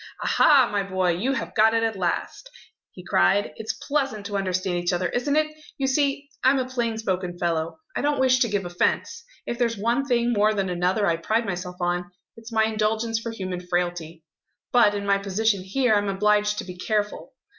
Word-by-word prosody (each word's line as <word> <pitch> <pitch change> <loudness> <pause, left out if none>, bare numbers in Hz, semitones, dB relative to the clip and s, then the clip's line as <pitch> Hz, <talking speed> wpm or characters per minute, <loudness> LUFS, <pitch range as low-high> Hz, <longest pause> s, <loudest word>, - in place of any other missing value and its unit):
"Aha, 280 -5 +5
my 205 -1 +1
boy, 185 -2 0
you 215 +11 -1
have - - -4
got 220 +1 +4
it 225 - +2
at 225 -1 0
last!" 180 -3 -3 0.4
he - - -13
cried. 90 - +2
"It's 220 0 -3
pleasant 270 -8 -1
to 205 -1 -4
understand 185 -2 -1
each 175 +1 0
other, 175 0 0
isn't 280 +4 -1
it? 310 0 +4 0.3
You 275 - -1
see, 280 +1 0 0.2
I'm 265 +2 +5
a 260 - 0
plain 235 -3 -2
spoken 185 -4 -2
fellow; 165 -2 -1 0.2
I - - -1
don't 290 -1 0
wish 255 -1 +4
to 250 - +3
give 205 -3 -2
offence. 175 - -1 0.2
If 240 - -4
there's 230 -2 +1
one 235 +6 +1
thing 240 -2 +2
more 215 0 +3
than 195 -2 -1
another 180 +4 +1
I 170 -3 +2
pride 220 +7 0
myself 180 -1 -4
on, 175 0 -1 0.3
it's 225 +1 -12
my 220 -1 +3
indulgence 220 +1 0
for 230 - -5
human 185 -5 -5
frailty. 175 -2 -3 0.5
But, 225 -4 +4
in 200 0 -3
my 200 0 +2
position 200 +1 0
here, 235 +5 +1
I'm 205 -1 +1
obliged 210 +1 +2
to - - -3
be 180 -1 -9
careful. 210 - -2
210 Hz, 200 wpm, -24 LUFS, 185-235 Hz, 0.5 s, Aha